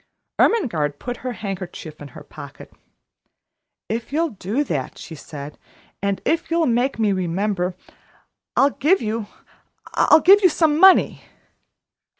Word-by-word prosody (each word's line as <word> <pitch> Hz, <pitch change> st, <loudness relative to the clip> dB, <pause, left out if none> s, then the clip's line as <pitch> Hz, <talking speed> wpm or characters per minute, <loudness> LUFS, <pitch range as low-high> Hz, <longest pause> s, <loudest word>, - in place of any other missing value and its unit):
Ermengarde 160 Hz, -, +1 dB
put 245 Hz, +6 st, -6 dB
her 255 Hz, -1 st, -5 dB
handkerchief 185 Hz, -7 st, -7 dB
in 145 Hz, -, -8 dB
her -, -, -10 dB
pocket. 140 Hz, -2 st, -12 dB, 1.1 s
"If 230 Hz, +3 st, -4 dB
you'll 325 Hz, +2 st, 0 dB
do 215 Hz, +7 st, -2 dB
that," 145 Hz, -, -4 dB
she 165 Hz, -, -10 dB
said, 145 Hz, -1 st, -9 dB, 0.4 s
"and 200 Hz, 0 st, -2 dB
if 330 Hz, +1 st, 0 dB
you'll 335 Hz, 0 st, +1 dB
make 245 Hz, +2 st, 0 dB
me 215 Hz, -2 st, +1 dB
remember, 185 Hz, 0 st, -1 dB, 0.8 s
I'll 280 Hz, +1 st, +4 dB
give 345 Hz, +9 st, +2 dB
you 220 Hz, -1 st, -3 dB, 0.7 s
I'll -, -, +5 dB
give 390 Hz, +6 st, +6 dB
you 370 Hz, -, +6 dB
some 310 Hz, -2 st, +1 dB
money." 380 Hz, +1 st, +5 dB
220 Hz, 135 wpm, -21 LUFS, -, 1.1 s, give